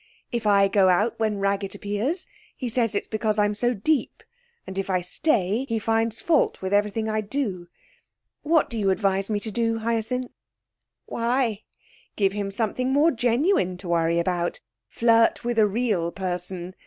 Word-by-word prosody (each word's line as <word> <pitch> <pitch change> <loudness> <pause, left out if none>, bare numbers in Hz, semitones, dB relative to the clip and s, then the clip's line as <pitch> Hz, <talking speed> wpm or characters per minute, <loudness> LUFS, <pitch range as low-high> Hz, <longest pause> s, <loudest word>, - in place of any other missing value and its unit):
If 235 -3 -2
I 200 -1 +5
go 195 -1 +4
out 205 +7 +1
when 215 -2 0
Raggett 195 0 -1
appears, 215 - -2 0.3
he 255 - -4
says 230 -2 0
it's 200 - -2
because 215 -1 -1
I'm 205 0 +2
so 240 +3 0
deep; 285 +9 -1 0.4
and 190 - -8
if 195 - -3
I 185 -1 +1
stay 210 - 0
he 230 - 0
finds 225 +1 0
fault 320 -4 +2
with 190 +1 -3
everything 210 +2 +1
I 215 0 0
do. 205 -6 -3 0.7
What 315 0 +2
do 230 - -4
you 200 -2 +1
advise 195 0 +1
me 210 -1 0
to 220 - -4
do, 225 +1 0
Hyacinth?' 230 +2 -2 0.7
'Why, 235 -2 -1 0.5
give 195 -2 +2
him 200 -1 -3
something 230 +5 -1
more 295 +5 +4
genuine 240 - +1
to 180 -1 -8
worry 170 0 +2
about 175 0 -1 0.3
flirt 230 0 +3
with 240 -1 0
a 215 - +5
real 205 -6 0
person. 180 -1 -4
215 Hz, 165 wpm, -24 LUFS, 195-235 Hz, 0.7 s, I